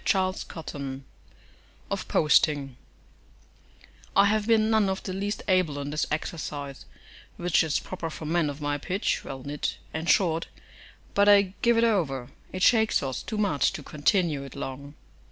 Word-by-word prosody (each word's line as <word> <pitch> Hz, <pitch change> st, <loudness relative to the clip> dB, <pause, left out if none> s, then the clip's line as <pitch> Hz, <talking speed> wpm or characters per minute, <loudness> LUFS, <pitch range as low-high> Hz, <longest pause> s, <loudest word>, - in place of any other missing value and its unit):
CHAPTER 185 Hz, -1 st, 0 dB, 0.2 s
XXII 135 Hz, -2 st, -6 dB, 0.9 s
OF -, -, -3 dB
POSTING 145 Hz, -3 st, +3 dB, 1.4 s
I 200 Hz, -, +7 dB
have 210 Hz, +1 st, +1 dB
been 220 Hz, -1 st, +4 dB
none 215 Hz, -3 st, +3 dB
of 190 Hz, 0 st, -3 dB
the 185 Hz, -, -4 dB
least 200 Hz, +2 st, -3 dB
able 185 Hz, -7 st, +2 dB
in 145 Hz, 0 st, -4 dB
this 150 Hz, 0 st, -1 dB
exercise, 145 Hz, -3 st, -4 dB, 0.5 s
which 175 Hz, -1 st, +2 dB
is 155 Hz, -2 st, 0 dB
proper 175 Hz, -3 st, -5 dB
for 160 Hz, -, -8 dB
men 165 Hz, -1 st, +1 dB
of 145 Hz, +1 st, -6 dB
my 145 Hz, 0 st, -1 dB
pitch, 190 Hz, +7 st, -1 dB
well 135 Hz, -1 st, -7 dB
knit 145 Hz, +1 st, -3 dB, 0.2 s
and 160 Hz, +2 st, -3 dB
short; 165 Hz, -3 st, +3 dB, 0.7 s
but 200 Hz, 0 st, +4 dB
I 200 Hz, -2 st, +5 dB
give 235 Hz, -1 st, +4 dB
it 230 Hz, -, +4 dB
over; 150 Hz, -, 0 dB, 0.2 s
it 185 Hz, +1 st, -3 dB
shakes 220 Hz, -, +4 dB
us 130 Hz, -2 st, -3 dB
too 220 Hz, -, -5 dB
much 200 Hz, -9 st, +2 dB
to -, -, -6 dB
continue 155 Hz, -1 st, +1 dB
it 140 Hz, -, -9 dB
long. 140 Hz, +2 st, -6 dB
165 Hz, 160 wpm, -27 LUFS, 145-200 Hz, 1.4 s, I